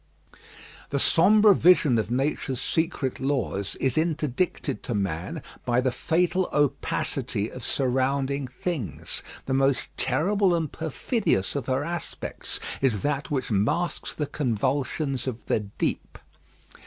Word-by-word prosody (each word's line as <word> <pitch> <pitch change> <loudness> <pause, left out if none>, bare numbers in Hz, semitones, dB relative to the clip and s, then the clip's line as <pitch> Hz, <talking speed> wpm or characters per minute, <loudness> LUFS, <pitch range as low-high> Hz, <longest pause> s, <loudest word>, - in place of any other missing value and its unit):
_ - - -18 0.5
The 140 - 0
sombre 205 +8 +6
vision 165 -9 +5
of 110 - -2
nature's 130 0 -1
secret 160 -5 -1
laws 105 - -1
is 135 +3 +1
interdicted 155 -2 -1
to 120 - -3
man 95 -4 -2 0.2
by 120 0 +2
the 130 0 +1
fatal 180 +6 +1
opacity 145 -2 0
of - - -9
surrounding 135 +1 0
things. 120 - -4 0.2
The 135 - -1
most 135 -1 +1
terrible 180 +7 +2
and 160 -4 -1
perfidious 160 - -1
of 140 -4 -3
her 130 +1 +1
aspects 170 +1 -4 0.2
is 120 -8 +1
that 145 -1 -1
which 130 -4 -2
masks 150 - 0
the 150 - -1
convulsions 135 +2 -1
of 120 -3 -4
the - - +1
deep. 105 -1 -3
135 Hz, 130 wpm, -26 LUFS, 125-160 Hz, 0.5 s, sombre